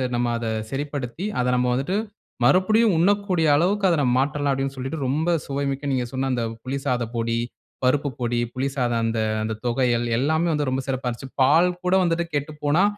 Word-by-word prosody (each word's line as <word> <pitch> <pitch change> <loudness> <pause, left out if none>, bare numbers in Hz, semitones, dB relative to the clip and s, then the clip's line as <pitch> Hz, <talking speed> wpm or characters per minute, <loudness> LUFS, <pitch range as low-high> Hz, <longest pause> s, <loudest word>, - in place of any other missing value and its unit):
நம்ம 120 0 0
அத 115 -1 -4 0.2
சரிப்படுத்தி 140 +2 -4 0.2
அத 125 - 0
நம்ம 125 0 +1
வந்துட்டு 140 +10 0 0.5
மறுபடியும் 215 +3 +4
உண்ணக்கூடிய 185 -2 +2
அளவுக்கு 195 +6 +2
அத 170 - +3
நம்ம 125 -3 +2
மாற்றலாம் 145 +1 0
அப்டின் 135 0 -2
சொல்லிட்டு 135 +5 -4
ரொம்ப 155 +6 0 0.2
சுவைமிக்க 140 0 -2
நீங்க 130 -2 0
சொன்ன 135 0 -1
அந்த 120 - -1 0.2
புளி 130 +2 -3
சாதம் 120 -2 -1
பொடி, 115 0 0 0.5
பருப்பு 140 +3 +2
பொடி, 120 -1 0
புளி 130 +1 -1
சாதம் 120 -3 0
அந்த 115 0 -1 0.2
அந்த 110 0 -2
தொகையல் 120 -1 +1
எல்லாமே 160 +6 +1
வந்து 145 -3 0
ரொம்ப 130 +1 -1
சிறப்பா 130 -1 -2
இருந்தது. 130 +3 -9
பால் 160 +7 +5 0.2
கூட 180 - +2
வந்துட்டு 170 -1 +1
கெட்டு 145 +2 -2
போனா 155 +7 +4
135 Hz, 180 wpm, -23 LUFS, 125-160 Hz, 0.5 s, பால்